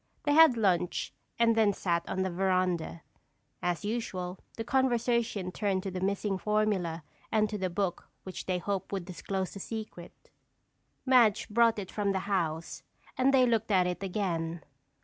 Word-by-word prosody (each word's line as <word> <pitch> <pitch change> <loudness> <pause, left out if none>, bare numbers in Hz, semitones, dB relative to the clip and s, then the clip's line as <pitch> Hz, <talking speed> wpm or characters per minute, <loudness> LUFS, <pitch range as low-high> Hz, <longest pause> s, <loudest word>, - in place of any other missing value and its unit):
They 290 - +2
had 315 -5 +7
lunch 180 -5 0 0.2
and 230 -1 +4
then 215 -2 +4
sat 170 -3 -1
on 190 - 0
the 190 - -2
veranda. 185 -2 0 0.6
As 175 +2 -1
usual 190 -5 -3 0.2
the 225 - -2
conversation 235 -6 +1
turned 195 -2 -1
to 195 - -4
the 185 - -4
missing 195 0 -1
formula 200 -7 0 0.3
and 215 -1 +3
to 210 - -2
the 185 -1 -1
book 180 0 -2
which 185 - -7
they 185 -1 +1
hoped 195 +1 -3
would 195 -3 -3
disclose 190 +1 -4
the 200 - -8
secret. 215 -4 -8 0.7
Madge 240 -5 +4
brought 230 +1 +4
it 195 -3 -5
from 200 -2 0
the 190 - 0
house 165 -5 -2 0.3
and 260 +1 +3
they 260 -2 +5
looked 225 -2 +1
at 185 -3 +4
it 180 +1 -2
again. 175 -5 -2
195 Hz, 165 wpm, -30 LUFS, 180-220 Hz, 0.7 s, had